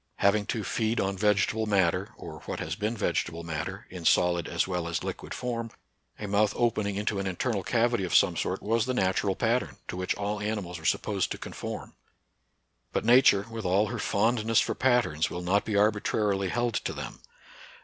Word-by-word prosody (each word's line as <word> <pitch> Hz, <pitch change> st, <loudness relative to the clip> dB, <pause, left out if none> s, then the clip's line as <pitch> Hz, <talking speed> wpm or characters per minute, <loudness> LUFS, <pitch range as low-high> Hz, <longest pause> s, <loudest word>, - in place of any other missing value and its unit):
Hav 100 Hz, +1 st, +3 dB
ing 105 Hz, -1 st, -1 dB
to 110 Hz, -3 st, -2 dB
feed 110 Hz, +4 st, 0 dB
on 95 Hz, 0 st, 0 dB
vegetable 105 Hz, +2 st, +1 dB
matter, 95 Hz, -5 st, +1 dB
or -, -, -9 dB
what -, -, -3 dB
has -, -, -3 dB
been 110 Hz, +3 st, -2 dB
vegetable 85 Hz, -4 st, -1 dB
matter, 80 Hz, -2 st, -4 dB
in 90 Hz, -2 st, -7 dB
solid 85 Hz, 0 st, +3 dB
as -, -, 0 dB
well 90 Hz, -2 st, -2 dB
as 85 Hz, -1 st, -2 dB
liquid -, -, -6 dB
form, 115 Hz, -2 st, -3 dB, 0.5 s
a 105 Hz, -, -5 dB
mouth 105 Hz, +1 st, +2 dB
opening 105 Hz, -4 st, 0 dB
into 105 Hz, 0 st, -1 dB
an 95 Hz, -, -2 dB
internal 100 Hz, +3 st, -1 dB
cavity 120 Hz, +2 st, +1 dB
of 90 Hz, -, -1 dB
some 90 Hz, -, +5 dB
sort 90 Hz, +3 st, -2 dB
was 115 Hz, +2 st, +1 dB
the 130 Hz, -, 0 dB
natural 95 Hz, -1 st, +1 dB
pattern, 120 Hz, +2 st, 0 dB
to -, -, -5 dB
which 90 Hz, 0 st, -1 dB
all 105 Hz, +1 st, -2 dB
animals 105 Hz, -5 st, -3 dB
were 80 Hz, -, -12 dB
supposed -, -, +1 dB
to -, -, -3 dB
conform. -, -, -7 dB, 1.0 s
But -, -, -1 dB
Nature, 120 Hz, -4 st, +6 dB
with 115 Hz, -1 st, -5 dB
all 100 Hz, +3 st, +2 dB
her 120 Hz, -1 st, -4 dB
fondness 115 Hz, +2 st, +2 dB
for -, -, +1 dB
patterns, 120 Hz, -12 st, +2 dB
will 90 Hz, -, -5 dB
not 95 Hz, +3 st, +2 dB
be 105 Hz, -, -2 dB
arbitrarily 105 Hz, -2 st, +1 dB
held 120 Hz, +3 st, 0 dB
to -, -, -2 dB
them. -, -, -7 dB
105 Hz, 190 wpm, -28 LUFS, 95-115 Hz, 1.0 s, Nature